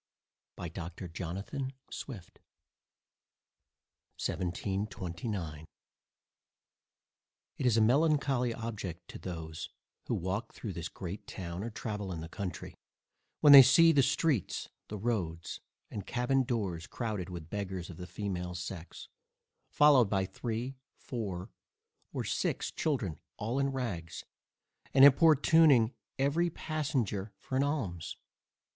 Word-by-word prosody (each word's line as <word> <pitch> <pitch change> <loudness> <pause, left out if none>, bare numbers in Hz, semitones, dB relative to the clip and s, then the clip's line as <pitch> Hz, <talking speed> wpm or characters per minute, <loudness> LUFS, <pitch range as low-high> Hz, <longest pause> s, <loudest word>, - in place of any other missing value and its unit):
by 90 - -5
Dr. 85 +2 -6
Jonathan 100 - -4 0.2
Swift 105 -10 -8 1.8
1729 90 -2 -3 1.9
It 135 - -2
is 115 -2 +4
a - - +5
melancholy 135 0 +3
object 100 -7 -5
to - - -8
those, 80 -3 -6 0.4
who - - +1
walk 100 +6 -3
through 105 -5 -5
this 85 -1 -4
great 95 +2 -7
town, 85 0 -5
or 115 - -3
travel 105 -3 -4
in 85 - -4
the 80 - -6
country, 90 0 -5 0.7
when 145 - +9
they 140 - +14
see 165 +6 +7
the 145 -3 +5
streets, 135 - +1 0.2
the 105 - -5
roads, 95 -7 -2 0.3
and 100 - -6
cabbin 125 +2 +1
doors 100 -9 -2
crowded 105 -7 -3
with 85 -3 -8
beggars 95 -4 -4
of 80 - -11
the 90 0 -7
female 90 -2 -4
sex, 90 -1 -7 0.6
followed 140 -7 +6
by 95 -2 +1
three, 120 +6 -4 0.2
four, 100 -5 -5 0.6
or - - -2
six - - -1
children, 120 - -1 0.2
all 115 +6 -1
in 140 0 +2
rags, 115 -12 -4 0.7
and 135 0 +10
importuning 145 -4 +6 0.2
every 145 +6 +2
passenger 135 - -2
for 130 - -6
an 130 - +3
alms. 125 - -2
105 Hz, 120 wpm, -32 LUFS, 90-130 Hz, 1.9 s, they